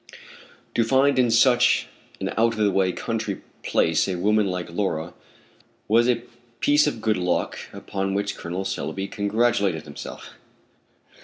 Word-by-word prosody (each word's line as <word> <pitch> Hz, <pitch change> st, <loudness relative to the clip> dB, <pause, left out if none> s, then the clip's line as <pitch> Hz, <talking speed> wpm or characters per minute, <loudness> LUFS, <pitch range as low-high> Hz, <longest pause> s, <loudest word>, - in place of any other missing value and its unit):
To 115 Hz, -, +2 dB
find 135 Hz, +3 st, +3 dB
in 125 Hz, -2 st, +4 dB
such 125 Hz, +1 st, +4 dB, 0.3 s
an -, -, -2 dB
out 115 Hz, +1 st, +2 dB
of -, -, -6 dB
the 105 Hz, -2 st, +2 dB
way 95 Hz, -1 st, +2 dB
country -, -, -4 dB, 0.2 s
place 80 Hz, -1 st, +2 dB
a 95 Hz, -, -1 dB
woman 105 Hz, +3 st, +2 dB
like 90 Hz, -2 st, -4 dB
Laura 85 Hz, -3 st, -2 dB, 0.7 s
was 115 Hz, +3 st, +4 dB
a 120 Hz, -1 st, +1 dB, 0.4 s
piece 145 Hz, +3 st, +4 dB
of 115 Hz, -7 st, -3 dB
good 110 Hz, -1 st, +1 dB
luck 90 Hz, -1 st, -1 dB
upon 95 Hz, 0 st, -3 dB
which 100 Hz, 0 st, -1 dB
Col. 90 Hz, +3 st, -5 dB
Selby 95 Hz, +2 st, -3 dB
congratulated 100 Hz, -5 st, 0 dB
himself. 75 Hz, -2 st, -9 dB
100 Hz, 145 wpm, -24 LUFS, 90-115 Hz, 0.7 s, in